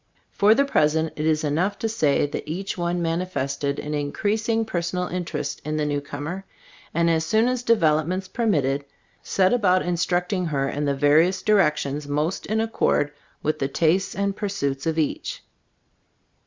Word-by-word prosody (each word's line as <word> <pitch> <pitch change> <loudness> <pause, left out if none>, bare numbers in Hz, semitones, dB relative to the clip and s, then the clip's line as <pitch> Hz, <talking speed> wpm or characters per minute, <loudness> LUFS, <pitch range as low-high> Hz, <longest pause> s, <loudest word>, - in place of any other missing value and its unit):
For 210 +2 +4
the 280 +3 +3
present 160 - +1
it 155 +1 -1
is 155 -1 +2
enough 165 +7 0
to 225 - -1
say 155 -12 +2
that 145 - -5
each 190 +5 -3
one 175 0 -1
manifested 145 -5 -2
an 150 - -4
in 145 -1 -2
creasing 220 +2 0
personal 180 -2 -2
interest 180 -1 -4
in 155 0 -2
the 150 - 0
new 145 -1 -1
comer, 150 +6 -6 0.5
and 170 0 +1
as 165 -1 +2
soon 220 +7 +2
as 250 -1 0
developments 185 -4 +2
permitted, 145 - 0 0.4
set 190 +1 +2
about 185 -6 +3
instructing 180 +1 0
her 135 -3 0
in 145 +1 -2
the 140 -1 +1
various 155 +6 +3
directions 150 -8 +2
most 150 +5 -1
in 220 +2 0
accord 220 -9 +1 0.3
with 155 - 0
the 135 - 0
tastes 170 +7 +1
and 200 0 -1
pursuits 155 -10 -2
of 160 0 0
each. 155 -2 -2
170 Hz, 165 wpm, -24 LUFS, 150-195 Hz, 0.5 s, For